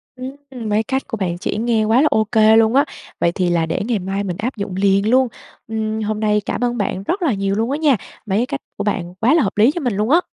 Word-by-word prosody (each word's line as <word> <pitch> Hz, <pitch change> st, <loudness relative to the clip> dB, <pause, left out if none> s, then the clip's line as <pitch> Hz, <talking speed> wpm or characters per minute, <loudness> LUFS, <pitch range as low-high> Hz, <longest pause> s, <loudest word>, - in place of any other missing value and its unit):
Ừm, 260 Hz, -2 st, -8 dB
mấy 210 Hz, +1 st, +2 dB
cách 265 Hz, +4 st, -2 dB
của 225 Hz, -, -4 dB
bạn 175 Hz, -4 st, -2 dB
chỉ 185 Hz, -, -3 dB
nghe 225 Hz, 0 st, +1 dB
quá 225 Hz, +4 st, +4 dB
là 305 Hz, -, +4 dB
ô 220 Hz, -, +3 dB
kê 220 Hz, 0 st, +4 dB
luôn 225 Hz, +2 st, +4 dB
á, 280 Hz, +2 st, +5 dB, 0.3 s
vậy 170 Hz, -, +2 dB
thì 180 Hz, 0 st, 0 dB
là 170 Hz, -1 st, +1 dB
để 165 Hz, +3 st, -2 dB
ngày 225 Hz, -3 st, 0 dB
mai 195 Hz, +2 st, -3 dB
mình 180 Hz, -2 st, -4 dB
áp 240 Hz, +5 st, -3 dB
dụng 200 Hz, -2 st, -4 dB
liền 200 Hz, +2 st, +2 dB
luôn. 260 Hz, +2 st, +4 dB, 0.4 s
Ừm, 220 Hz, 0 st, -2 dB
hôm 215 Hz, 0 st, -2 dB
nay 210 Hz, -1 st, +2 dB
cảm -, -, -2 dB
ơn 240 Hz, 0 st, 0 dB
bạn 195 Hz, -2 st, -2 dB
rất 360 Hz, -, -2 dB
là 315 Hz, -8 st, +2 dB
nhiều 195 Hz, 0 st, -1 dB
luôn 225 Hz, +4 st, 0 dB
á 285 Hz, -, 0 dB
nha, 300 Hz, -4 st, +3 dB, 0.3 s
mấy 200 Hz, -1 st, 0 dB
cái 240 Hz, -, +2 dB
cách 280 Hz, +1 st, -5 dB, 0.2 s
của 205 Hz, -, -2 dB
bạn 180 Hz, -4 st, -2 dB
quá 225 Hz, +8 st, +2 dB
là 320 Hz, -3 st, +4 dB
hợp 195 Hz, -, -3 dB
lý 220 Hz, +6 st, +5 dB
cho 345 Hz, -, -4 dB
mình 245 Hz, -6 st, 0 dB
luôn 210 Hz, +3 st, 0 dB
á. 335 Hz, +5 st, +5 dB
220 Hz, 285 wpm, -19 LUFS, 200-255 Hz, 0.4 s, á